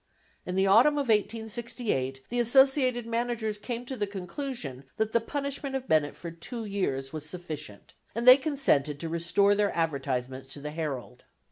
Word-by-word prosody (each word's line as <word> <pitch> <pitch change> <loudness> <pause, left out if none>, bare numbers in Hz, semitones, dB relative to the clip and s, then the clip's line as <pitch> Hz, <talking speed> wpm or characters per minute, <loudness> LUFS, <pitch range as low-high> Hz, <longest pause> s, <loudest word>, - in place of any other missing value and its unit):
In 180 - -2
the 190 +1 +3
autumn 225 +10 +6
of 280 -4 -1
1868, 220 - -1
the 245 - -1
associated 255 0 +4
managers 230 -2 -2
came 240 +2 -5
to 265 - -4
the 210 -4 -2
conclusion 190 - -5
that 220 0 0
the 235 - +2
punishment 280 +1 -4
of 265 -1 -3
Bennett 155 -2 +2
for 170 - -7
two 225 +8 -6
years 140 -10 -2
was 155 -1 -6
sufficient, 155 - -8 0.2
and 235 +2 -2
they 255 +1 +11
consented 260 - +1
to 165 - -4
restore 170 +5 +3
their 205 0 +2
advertisements 135 -4 -2
to - - -9
the 150 +1 -6
Herald. 140 -6 -5
205 Hz, 165 wpm, -28 LUFS, 150-240 Hz, 0.2 s, they